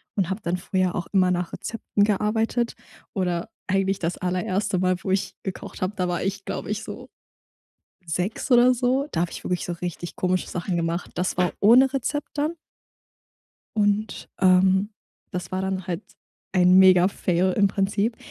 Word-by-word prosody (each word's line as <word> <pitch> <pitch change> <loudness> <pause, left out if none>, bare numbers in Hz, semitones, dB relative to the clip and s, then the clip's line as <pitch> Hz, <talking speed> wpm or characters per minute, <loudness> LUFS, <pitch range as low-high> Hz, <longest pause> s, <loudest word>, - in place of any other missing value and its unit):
und 190 -4 0
hab 195 +3 -3
dann 175 -1 -1
früher 185 0 -1
auch 175 - -2
immer 185 -2 +4
nach 180 -1 -1
Rezepten 210 -2 -1
gearbeitet 220 +3 0 0.4
oder 180 -1 -1 0.2
eigentlich 195 0 +1
das 170 +1 -2
allererste 185 +2 -1
Mal, 185 0 +2
wo 190 - -2
ich 190 0 -1
gekocht 190 - -7
hab, 190 +3 -2
da 180 -3 -1
war 175 -1 -1
ich, 195 +1 -3
glaub - - -4
ich, 210 +1 -3
so - - -8 1.0
6 180 - -2
oder 245 +1 +7
so. 255 +3 +1
Da 165 - -1
hab 175 - 0
ich - - -8
wirklich 180 -1 -2
so 175 - -3
richtig 175 0 -6
komische 185 0 0
Sachen 175 0 -2
gemacht. 170 +1 -2
Das 180 +1 -1
war 180 -1 +2
ohne 250 +6 +6
Rezept 285 +2 -2
dann 300 +3 0 1.2
und 210 0 0
ähm, 190 +2 +4 0.4
das 180 -2 -5
war 185 0 -1
dann 190 -1 -3
halt 175 +1 -2 0.5
ein 180 -1 +5
Mega 185 -1 +7
Fail 185 -1 0
im 200 +1 +4
Prinzip. 200 +3 0
190 Hz, 170 wpm, -24 LUFS, 180-210 Hz, 1.2 s, oder